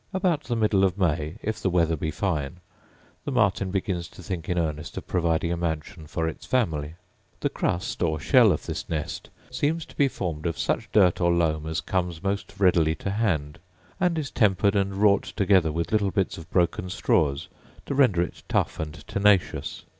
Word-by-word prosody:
About 180 -5 0
the 120 - -1
middle 105 -3 +2
of 95 -1 +2
May, 80 -4 0
if 110 +1 -3
the 95 - +1
weather 85 -2 +2
be 80 +1 -3
fine, 80 -3 -2 0.7
the - - -4
martin 100 -6 +2
begins 95 -3 -2
to 90 +2 -14
think 85 -2 -5
in 90 - 0
earnest 80 +1 -3
of - - -5
providing 85 -1 0
a - - +1
mansion 80 0 -4
for 80 +1 -2
its 80 - -6
family. 80 - -1 0.5
The - - 0
crust 90 +2 -2
or 80 -3 +1
shell 115 - +5
of 75 - -2
this - - -5
nest 80 -3 -4 0.2
seems 155 +2 -1
to - - -17
be 140 - +3
formed 85 - -3
of 85 - -3
such - - -1
dirt 90 -4 +4
or 85 0 +3
loam 80 -3 +1
as 80 -1 -2
comes 90 0 -2
most 100 0 -3
readily 85 -5 +3
to 100 - -4
hand, 85 -9 -1 0.4
and 180 -3 +1
is 150 -4 -3
tempered 100 -1 +2
and 100 -1 0
wrought 100 0 +2
together 95 -5 +3
with 85 +2 -3
little 105 -2 +2
bits 95 -1 -1
of 80 - -11
broken 90 0 +1
straws 70 -5 +1 0.4
to - - -3
render 125 -11 +4
it 90 - -7
tough - - 0
and 75 -2 -6
tenacious. 100 -2 +1
90 Hz, 190 wpm, -25 LUFS, 80-100 Hz, 0.7 s, shell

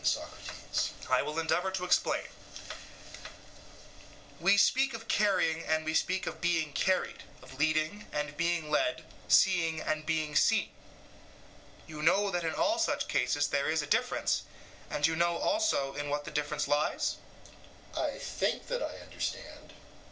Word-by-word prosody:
SOCRATES: - - -2 0.2
I - - +5
will 150 +1 -4
endeavour 165 +3 +1
to 190 -1 -3
explain: 180 - +2 2.1
we, 200 +1 +4
speak 265 +4 +3
of 225 0 -9
carrying 185 -6 +2
and 155 0 0
we 155 - -1
speak 185 +3 +1
of 160 - -5
being 165 -4 +1
carried, 185 +5 0 0.2
of 130 +1 -13
leading 155 +6 0
and 150 0 -3
being 170 -1 -1
led, 315 - +1 0.2
seeing 165 -5 +4
and 155 0 -2
being 155 -1 -1
seen. - - +3 1.1
You 155 -1 -8
know 195 +5 +3
that 175 -1 -1
in 160 -1 -1
all 330 +2 +1
such 335 - 0
cases 145 0 +1
there 140 +1 0
is 160 -1 +1
a 145 - +2
difference, - - 0 0.5
and 145 - +1
you 160 +1 +2
know 170 +1 +2
also 300 - +1
in 145 0 -4
what 145 0 -2
the 150 - -6
difference 150 0 -1
lies? 145 +1 0 0.8
EUTHYPHRO: - - -1
I - - -2
think - - -2
that - - -1
I - - -4
understand. - - -6
160 Hz, 150 wpm, -31 LUFS, 150-190 Hz, 2.1 s, I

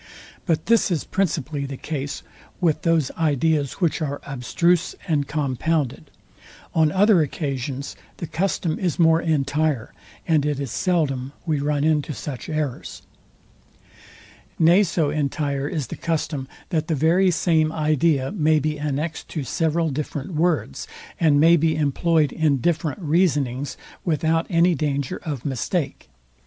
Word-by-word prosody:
But 160 -3 +1
this 230 -2 +3
is 170 -6 0
principally 150 -7 -1
the 135 -1 -6
case 145 -1 -4 0.4
with 165 -4 +1
those 165 -5 +2
ideas 150 -2 +1
which 170 -2 0
are 145 -2 -2
abstruse 165 +6 0
and 145 -4 +1
compounded. 140 - -1 0.6
On 160 -2 +3
other 195 -1 +5
occasions 140 -2 -3 0.2
the - - -4
custom 170 0 -1
is 180 -4 -1
more 165 -1 +4
entire, 145 -4 0 0.3
and 160 -4 +3
it 145 -1 -1
is 140 -5 -4
seldom 140 -7 0
we 155 -4 0
run 145 0 0
into 155 -1 +1
such 130 +5 -6
errors. 155 -5 -4 1.5
Nay 170 +5 +6
so 165 -6 +1
entire 140 -1 -1
is 150 -4 -2
the - - -7
custom, 155 -4 -2 0.2
that 160 -4 -1
the 160 - 0
very 170 +6 +3
same 160 -2 +2
idea 155 -2 +1
may 155 -5 +2
be 150 0 -1
annext 150 +2 -3
to 155 - -4
several 160 +4 0
different 150 +4 -4
words, 160 - 0 0.3
and 150 -4 +4
may 165 +3 +7
be 160 -1 +2
employed 155 +1 +2
in 155 -3 +2
different 155 - -1
reasonings, 145 -5 +1 0.3
without 165 0 +1
any 175 0 +4
danger 140 -4 -1
of 145 -6 -5
mistake. 140 +3 -2
155 Hz, 140 wpm, -23 LUFS, 140-165 Hz, 1.5 s, may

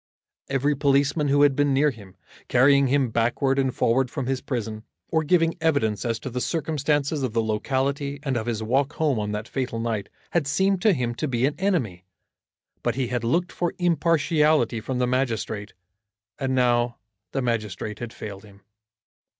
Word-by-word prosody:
Every 140 +2 +1
policeman 140 +2 +2
who 145 +1 +4
had 140 -2 +4
been 145 0 +2
near 145 +2 +3
him, 100 -6 -14 0.3
carrying 140 +2 +5
him 135 -2 +1
backward 120 +4 +1
and 130 -1 +1
forward 125 +2 +1
from 135 0 -4
his 130 0 -1
prison, 110 -4 -4 0.3
or 160 -1 +1
giving 165 +1 +3
evidence 140 -10 +1
as 115 -1 0
to 130 - -5
the 125 +1 -3
circumstances 150 -2 0
of 130 -4 -2
the 115 -1 +1
locality 140 +6 -1
and 135 -3 -1
of 115 -1 -2
his 110 -2 -2
walk 135 +6 +1
home 145 -7 +1
on 105 0 -2
that 105 +2 -4
fatal 130 -4 -3
night, 115 -3 -2 0.2
had 165 -5 +1
seemed 190 +6 +1
to 215 0 +5
him 125 -6 -1
to 135 +6 -3
be 125 -1 +1
an 145 - +1
enemy. 135 - 0 0.8
But 120 -2 -1
he 130 -3 -1
had 125 -2 -2
looked 170 +10 +1
for 175 -1 -2
impartiality 155 -7 +2
from 130 +3 -3
the 125 - +2
magistrate, 115 -5 -2 0.7
and 130 -1 0
now 120 -1 +2 0.3
the 135 - -1
magistrate 105 -3 -3
had 120 -1 -5
failed 100 -4 -8
him. 100 -2 -17
130 Hz, 180 wpm, -24 LUFS, 115-145 Hz, 0.8 s, carrying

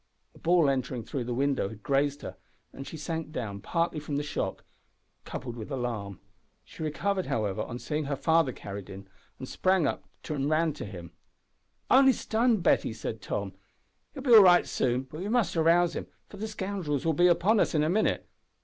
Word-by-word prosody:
A - - -18
ball 170 -2 +3
entering 130 -3 -1
through 125 +2 -4
the 125 - -4
window 135 -5 0
had 110 0 -12
grazed 140 +1 0
her, - - -6 0.4
and 135 - -8
she 160 - -7
sank 160 0 -4
down, 105 -9 -5
partly 165 - -1
from 150 -1 -5
the 145 - -1
shock, 150 - -3 0.6
coupled 120 -2 -6
with 115 +1 -7
alarm. 115 - -4 0.5
She - - -12
recovered, 185 +5 -1
however, 105 -2 -1
on 115 +2 -5
seeing 150 +3 -3
her 140 0 -2
father 160 -1 +2
carried 100 -4 -8
in, 95 0 -10 0.4
sprang 185 +5 +1
up, - - -2 0.2
and 145 -2 -1
ran 155 0 +2
to - - -7
him. 85 -4 -9 0.8
"Only 265 +1 +7
stunned, 225 -3 +1
Betty," 115 - +2
said 110 0 -6
Tom; 100 -2 -4 0.6
"will 270 - -7
be 250 -4 +4
all 220 - +11
right 180 -2 +6
soon, 125 0 0
but 150 +4 -10
we 190 - -4
must 235 -5 +1
rouse 170 +1 +3
him, - - -5 0.2
for 205 - -13
the 215 +2 -4
scoundrels 190 -9 -3
will 165 - +2
be 175 +4 +4
upon 195 +5 +3
us - - +1
in 150 - +3
a - - +1
minute. 215 +5 +1
150 Hz, 195 wpm, -28 LUFS, 125-175 Hz, 0.8 s, all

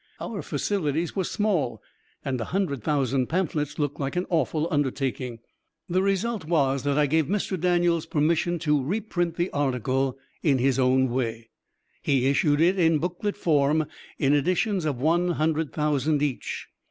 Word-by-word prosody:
Our - - -4
facilities 165 -4 -1
were 190 - 0
small, 180 - 0 0.5
and 130 -3 -1
a - - -2
hundred 175 - -2
thousand 135 -3 +1
pamphlets 150 -4 -1
looked 145 -2 -2
like 140 +2 -2
an 180 +1 0
awful 160 0 +1
undertaking. 130 -4 -1 0.5
The 185 +1 +1
result 200 +2 0
was 140 -5 +1
that 140 0 +1
I 150 - +4
gave 155 +1 +1
Mr. 200 0 -1
Daniels 175 -1 +2
permission 165 +3 +1
to 150 -3 +2
reprint 175 0 -1
the 175 +2 -1
article 130 -1 0 0.2
in 140 -5 +3
his 135 +1 +1
own 130 0 +3
way. 115 -2 -3 0.5
He 135 -3 +1
issued 145 +2 +3
it 185 +3 +3
in 165 -2 +4
booklet 180 +6 -3
form 155 -3 +2 0.3
in 140 +1 +2
editions 180 +5 +1
of 140 -5 -1
one 170 +5 +2
hundred 155 -1 0
thousand 150 -1 +1
each. 140 -4 -3
150 Hz, 155 wpm, -26 LUFS, 135-175 Hz, 0.5 s, I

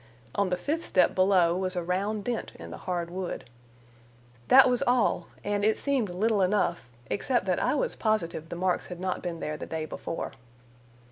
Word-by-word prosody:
On 200 -2 +1
the 180 - 0
fifth 320 - -2
step 185 - +3
below 185 -3 +4
was 185 0 -2
a 175 - -1
round 200 +4 -1
dent 240 +1 -3
in 85 0 -9
the 85 - -6
hard 170 -1 -2
wood. 185 -6 -4 1.0
That 265 0 +8
was 250 0 +1
all, 245 -1 +2 0.2
and 205 0 -1
it 220 +1 +3
seemed 270 -7 0
little 205 +3 +1
enough, 180 - +1 0.2
except 240 0 0
that 185 -2 +1
I 255 - +2
was - - -1
positive 170 -7 -1
the - - -5
marks 180 +1 0
had 180 -1 -7
not 185 0 -2
been 170 -2 -4
there 155 0 -3
the - - -7
day 160 -1 -3
before. 165 +1 -5
185 Hz, 190 wpm, -28 LUFS, 175-215 Hz, 1.0 s, That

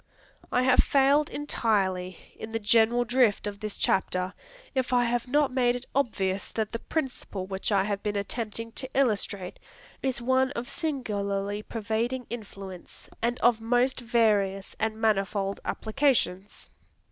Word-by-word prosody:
I 250 - +3
have 255 -1 +4
failed 285 0 +4
entirely 190 - 0 0.2
in 220 - -7
the 225 - -2
general 230 +2 +3
drift 240 -4 +3
of 205 -1 -4
this 215 -1 -4
chapter, 185 0 +1 0.4
if 260 -2 0
I 245 -1 +5
have 240 +1 0
not 285 0 +2
made 245 -2 +3
it 245 +1 -6
obvious 200 -8 0
that 220 -2 -1
the 230 - -3
principle 250 - -3
which 190 +2 -3
I 195 -2 +4
have 200 0 -2
been 210 -1 -2
attempting 225 +2 -3
to 260 +3 -5
illustrate 205 -7 0 0.4
is 265 -2 -1
one 260 +2 +2
of 240 -1 -4
singularly 205 -9 -2
pervading 230 +4 -2
influence, 195 -5 -9
and 240 +2 0
of 235 -1 +4
most 245 +3 +2
various 210 -5 +1
and 220 0 -1
manifold 200 -2 0
applications. 220 -5 0
225 Hz, 145 wpm, -27 LUFS, 200-250 Hz, 0.4 s, I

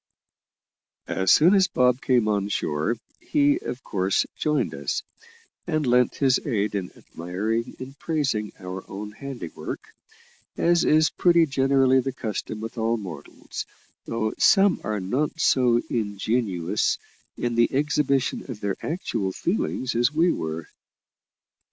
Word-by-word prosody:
As 95 -1 +1
soon 170 +5 +6
as 195 -2 +5
Bob 125 +1 +2
came 125 -7 +2
on 100 -1 0
shore, 75 +4 -1 0.2
he, 300 -3 +2
of 130 - -6
course, 95 -1 +1
joined 150 -1 0
us, - - -3 0.6
and 155 -3 0
lent 125 -1 +3
his 135 -2 +3
aid 105 -6 -1
in 95 -3 -3
admiring 105 +8 -4
and 130 +1 -9
praising 135 -10 -1
our 95 0 -7
own 105 +2 -6
handiwork, 125 - -6 0.8
as 170 0 +3
is 155 +1 +4
pretty 170 -2 +4
generally 135 -2 +3
the 135 - -3
custom 110 -2 -4
with 115 +1 -6
all 115 +1 +1
mortals, 85 -9 -8 0.4
though 110 -1 -1
some 195 -2 +5
are 105 0 -2
not 130 - -1
so 125 -5 +4
ingenuous 105 -4 0 0.4
in 120 -1 -1
the 115 0 +3
exhibition 140 -1 +1
of 120 -5 -6
their 100 -2 -2
actual 110 - -2
feelings 130 - -1
as 120 +3 +2
we 165 +3 +3
were. 80 0 -4
120 Hz, 135 wpm, -25 LUFS, 105-145 Hz, 0.8 s, soon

